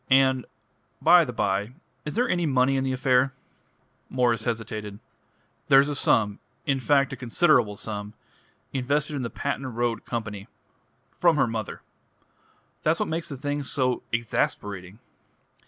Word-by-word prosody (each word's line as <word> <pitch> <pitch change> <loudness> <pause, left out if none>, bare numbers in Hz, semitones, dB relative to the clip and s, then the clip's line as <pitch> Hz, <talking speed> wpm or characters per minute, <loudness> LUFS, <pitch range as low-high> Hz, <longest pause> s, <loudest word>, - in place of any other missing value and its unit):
And, 130 -1 +4 0.5
by 170 +1 +6
the 125 - -5
bye, 105 0 -1 0.3
is 150 - -4
there 245 +2 +2
any 175 -2 +1
money 135 -1 +3
in 135 - +1
the 135 - -1
affair?" 130 +1 +2 0.8
Mwres 120 -3 +1
hesitated. 110 -3 -4 0.7
"There's 135 +1 +6
a 145 - -2
sum 105 -6 +2 0.3
in 135 -3 +1
fact, 140 +1 +2
a - - -3
considerable 125 - +2
sum 105 0 -6 0.6
invested 145 +3 0
in 140 - -2
the 120 - -3
Patent 135 -3 -4
Road 120 -1 -1
Company. 105 -4 -5 0.7
From 170 -2 +5
her 135 - +4
mother. 115 -3 -5 1.0
That's 155 +2 +1
what - - -1
makes 165 +1 -3
the 140 - -6
thing 145 +2 -2
so 130 -2 0
exasperating." 105 -4 -2
130 Hz, 140 wpm, -26 LUFS, 115-140 Hz, 1.0 s, by